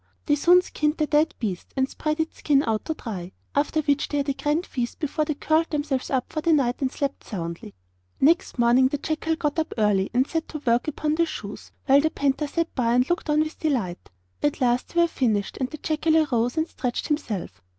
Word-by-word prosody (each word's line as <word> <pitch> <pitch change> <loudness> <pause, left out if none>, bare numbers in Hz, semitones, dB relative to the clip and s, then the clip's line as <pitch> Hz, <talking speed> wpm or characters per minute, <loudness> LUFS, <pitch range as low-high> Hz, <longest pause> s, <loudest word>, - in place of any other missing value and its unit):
They 295 - +2
soon 355 +5 +5
skinned 300 -2 -1
the 310 - +2
dead 300 +1 +2
beasts, 195 -7 -4
and 265 0 +2
spread 305 +3 -3
its 320 0 -2
skin 285 -2 +3
out 220 -1 -1
to 315 - -2
dry, 190 -9 -6 0.2
after 300 +2 +1
which 285 -1 +1
they 290 - -2
had 280 0 0
a - - +2
grand 300 +5 -1
feast 240 -2 -4
before 305 0 -1
they 305 - -2
curled 315 +3 +1
themselves 290 -3 -2
up 260 -2 -1
for 310 - -1
the 330 +1 +3
night, 255 -4 +1
and 260 -1 0
slept 280 -1 -3
soundly. 170 - -6 0.4
Next 325 +2 +3
morning 240 +2 +5
the 290 - -2
jackal 320 +2 -1
got 300 0 -1
up 320 - -2
early 205 -3 +2
and 250 +2 +2
set 325 +2 -3
to 305 - -6
work 235 +3 +2
upon 305 0 -1
the 335 +1 +2
shoes, - - -7
while 280 0 +6
the 315 - +2
panther 285 0 0
sat 335 +3 -2
by 235 -1 +1
and 250 +1 +3
looked 350 - -1
on 300 0 +4
with 310 0 -4
delight. 235 - -2 0.3
At 295 -1 0
last 245 -1 +1
they 345 - +2
were 340 - +4
finished, 220 -10 -1
and 260 -1 -2
the 310 - -7
jackal 315 +1 +1
arose 245 -4 +1
and 315 +1 +1
stretched 250 -6 -3
himself. 215 - -3
285 Hz, 225 wpm, -25 LUFS, 245-310 Hz, 0.4 s, while